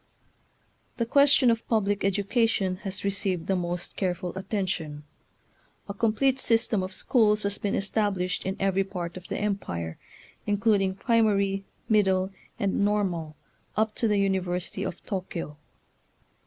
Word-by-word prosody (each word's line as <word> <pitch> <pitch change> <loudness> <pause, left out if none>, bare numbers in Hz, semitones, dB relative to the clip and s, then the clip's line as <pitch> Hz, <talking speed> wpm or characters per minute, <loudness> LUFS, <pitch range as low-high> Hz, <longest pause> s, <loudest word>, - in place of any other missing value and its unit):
The 235 - +1
question 280 0 +5
of 230 -1 -2
public 205 -3 +1
education 200 -1 +1
has 190 -1 -5
received 195 -3 -1
the, 190 - +1
most 175 -1 -3
careful 180 -2 -2
attention. 185 -7 -3 0.8
A 200 - -4
complete 235 +6 +2
system 225 -4 +2
of 185 +1 -4
schools 210 0 +2
has 200 0 -2
been 200 - -1
es 195 - -2
tablished 190 -4 0
in 190 0 -3
every 195 0 +2
part 180 -3 -5
of 185 0 -9
the - - -3
Empire, 90 - -3 0.5
including 205 -2 +2
primary, 200 -4 +2 0.2
middle, 190 -3 +3 0.3
and 200 0 0
normal, 185 -7 0 0.4
up 220 0 +2
to 230 - +2
the 210 -1 +2
University 185 -3 -1
of - - -5
Tokyo. 180 -6 -4
195 Hz, 135 wpm, -27 LUFS, 185-210 Hz, 0.8 s, question